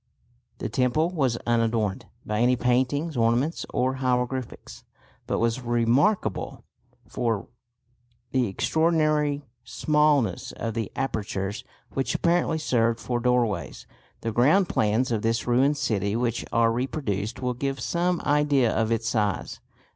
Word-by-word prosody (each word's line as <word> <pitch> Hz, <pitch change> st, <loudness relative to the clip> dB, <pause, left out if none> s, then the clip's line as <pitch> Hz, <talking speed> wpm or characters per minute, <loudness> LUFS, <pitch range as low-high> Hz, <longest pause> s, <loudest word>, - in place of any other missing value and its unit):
The -, -, -3 dB
temple 145 Hz, +7 st, +1 dB
was 135 Hz, -9 st, 0 dB
unadorned 115 Hz, -4 st, 0 dB, 0.2 s
by 105 Hz, 0 st, -1 dB
any 125 Hz, +2 st, +4 dB
paintings, 130 Hz, +6 st, 0 dB
ornaments 120 Hz, +7 st, +1 dB
or 130 Hz, +1 st, 0 dB
hieroglyphics, 125 Hz, -1 st, -2 dB, 0.4 s
but -, -, 0 dB
was 115 Hz, +2 st, 0 dB
remarkable 120 Hz, -, +1 dB, 0.4 s
for 115 Hz, -5 st, -2 dB, 0.8 s
the 130 Hz, -2 st, +2 dB
extraordinary 155 Hz, -, +1 dB, 0.2 s
smallness 150 Hz, -, +1 dB
of 115 Hz, -, -4 dB
the 115 Hz, -2 st, -3 dB
apertures 105 Hz, -5 st, -3 dB, 0.3 s
which 135 Hz, -2 st, -1 dB
apparently 170 Hz, -1 st, +1 dB
served 115 Hz, -6 st, +1 dB
for 120 Hz, -1 st, -2 dB
doorways. 115 Hz, -, 0 dB, 0.4 s
The 115 Hz, -, -2 dB
ground 150 Hz, -, +4 dB
plans 110 Hz, +5 st, +1 dB
of 110 Hz, -3 st, 0 dB
this 115 Hz, +1 st, 0 dB
ruined 130 Hz, +4 st, +3 dB
city 105 Hz, -7 st, -1 dB
which 120 Hz, -1 st, -1 dB
are 115 Hz, -1 st, +3 dB
reproduced 115 Hz, -, -2 dB
will 125 Hz, -1 st, -1 dB
give 135 Hz, +2 st, -3 dB
some 175 Hz, +6 st, 0 dB
idea 145 Hz, -5 st, +2 dB
of 110 Hz, 0 st, 0 dB
its 115 Hz, 0 st, 0 dB
size. 105 Hz, -4 st, -1 dB
125 Hz, 125 wpm, -25 LUFS, 115-140 Hz, 0.8 s, any